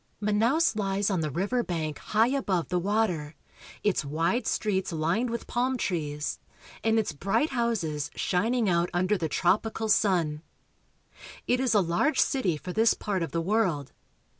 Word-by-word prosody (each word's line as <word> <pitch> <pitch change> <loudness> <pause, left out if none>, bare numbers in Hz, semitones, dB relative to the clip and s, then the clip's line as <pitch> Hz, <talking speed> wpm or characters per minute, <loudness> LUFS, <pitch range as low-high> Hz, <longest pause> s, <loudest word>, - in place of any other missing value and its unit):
Manaos 225 +9 +2
lies 200 -1 0
on 185 -4 0
the 155 - -1
river 200 - 0
bank 160 -7 -3
high 220 +3 +2
above 200 -11 -1
the 180 -1 +1
water, 180 -6 -1 0.5
its 205 -6 +1
wide 165 - 0
streets 190 -3 0
lined 170 +10 0
with 235 0 -4
palm 255 +2 0
trees, 150 -8 -2 0.4
and 225 0 +2
its 220 -6 +1
bright 195 - 0
houses 215 - -1
shining 225 +5 +1
out 175 -1 +2
under 185 +4 +2
the 165 -5 -2
tropical 220 +6 0
sun. 170 -8 +2 1.0
It 250 - +1
is 255 -4 +1
a 205 - +5
large 175 - +1
city 200 - +1
for 180 +4 -7
this 225 +3 +4
part 195 -3 -2
of 165 - -3
the 165 - -1
world. 175 - 0
195 Hz, 160 wpm, -27 LUFS, 170-225 Hz, 1.0 s, a